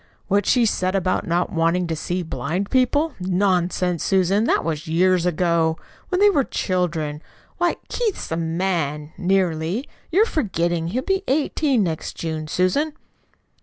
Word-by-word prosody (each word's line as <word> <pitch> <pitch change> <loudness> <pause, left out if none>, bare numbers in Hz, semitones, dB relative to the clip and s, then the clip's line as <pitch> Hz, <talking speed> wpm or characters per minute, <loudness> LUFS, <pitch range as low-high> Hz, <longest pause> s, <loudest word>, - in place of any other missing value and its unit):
What 205 +1 +2
she 245 -2 +4
said 185 -3 0
about 185 -1 0
not 175 +3 0
wanting 170 +1 +1
to 165 -1 -2
see 175 +3 -2
blind 180 +4 -3
people? 285 +4 +2
Nonsense, 180 -2 +1
Susan, 195 +3 +2
that - - +2
was 160 0 -3
years 180 +2 +3
ago, 170 -2 +1 0.3
when 365 - 0
they 410 0 +6
were 285 -7 +2
children! 165 -8 -2 0.4
Why, 350 0 +2
Keith's 450 - -2
a - - +1
man, 160 -3 -2
nearly. 180 - 0 0.2
You're 400 +6 +5
forgetting 175 - -1
he'll 245 +9 -2
be 385 +3 0
eighteen 280 -3 +1
next 165 -3 -3
June, 160 -2 -4
Susan." 230 - +1
180 Hz, 145 wpm, -22 LUFS, 165-225 Hz, 0.4 s, they